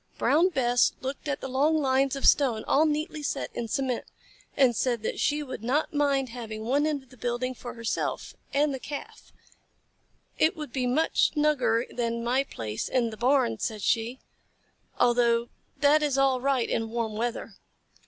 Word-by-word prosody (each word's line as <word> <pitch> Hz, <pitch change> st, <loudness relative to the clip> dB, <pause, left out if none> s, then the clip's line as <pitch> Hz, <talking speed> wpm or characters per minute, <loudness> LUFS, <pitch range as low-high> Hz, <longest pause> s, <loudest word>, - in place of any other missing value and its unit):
Brown 335 Hz, +6 st, +3 dB
Bess 245 Hz, -6 st, +2 dB
looked 270 Hz, +3 st, -5 dB
at 285 Hz, -, -2 dB
the -, -, -4 dB
long 285 Hz, +5 st, +2 dB
lines 270 Hz, -1 st, +2 dB
of 275 Hz, -, -3 dB
stone 245 Hz, -6 st, +4 dB
all 310 Hz, +3 st, +4 dB
neatly 305 Hz, +1 st, -2 dB
set 290 Hz, -, -3 dB
in 235 Hz, -, -3 dB
cement, 255 Hz, +1 st, -2 dB, 0.5 s
and 260 Hz, -4 st, +4 dB
said 240 Hz, -3 st, 0 dB
that -, -, -3 dB
she 300 Hz, 0 st, +1 dB
would 255 Hz, -5 st, -7 dB
not 280 Hz, +8 st, 0 dB
mind 280 Hz, -3 st, +1 dB
having 225 Hz, -2 st, -7 dB
one 280 Hz, +6 st, +1 dB
end 290 Hz, -3 st, -2 dB
of 265 Hz, -, -26 dB
the 255 Hz, -, -16 dB
building 245 Hz, +2 st, -2 dB
for 245 Hz, 0 st, -9 dB
herself 230 Hz, -1 st, -3 dB, 0.2 s
and 285 Hz, 0 st, +2 dB
the 265 Hz, -, -4 dB
Calf. 285 Hz, +2 st, -8 dB, 1.1 s
"It 315 Hz, -, +3 dB
would 300 Hz, -5 st, -7 dB
be 255 Hz, -2 st, 0 dB
much 300 Hz, +6 st, +2 dB
snugger 260 Hz, -6 st, +2 dB
than 235 Hz, -1 st, -3 dB
my 255 Hz, +3 st, +2 dB
place 110 Hz, -, -5 dB
in 235 Hz, -3 st, +1 dB
the -, -, -7 dB
barn," 245 Hz, -, +2 dB
said 215 Hz, -3 st, -3 dB
she, 230 Hz, +2 st, 0 dB, 0.8 s
"although 235 Hz, -1 st, +3 dB, 0.3 s
that 295 Hz, +1 st, +5 dB
is 290 Hz, -3 st, 0 dB
all 270 Hz, -2 st, +3 dB
right 265 Hz, -3 st, +1 dB
in 225 Hz, 0 st, -1 dB
warm 230 Hz, -1 st, -2 dB
weather." 235 Hz, +2 st, -3 dB
255 Hz, 175 wpm, -27 LUFS, 235-285 Hz, 1.1 s, that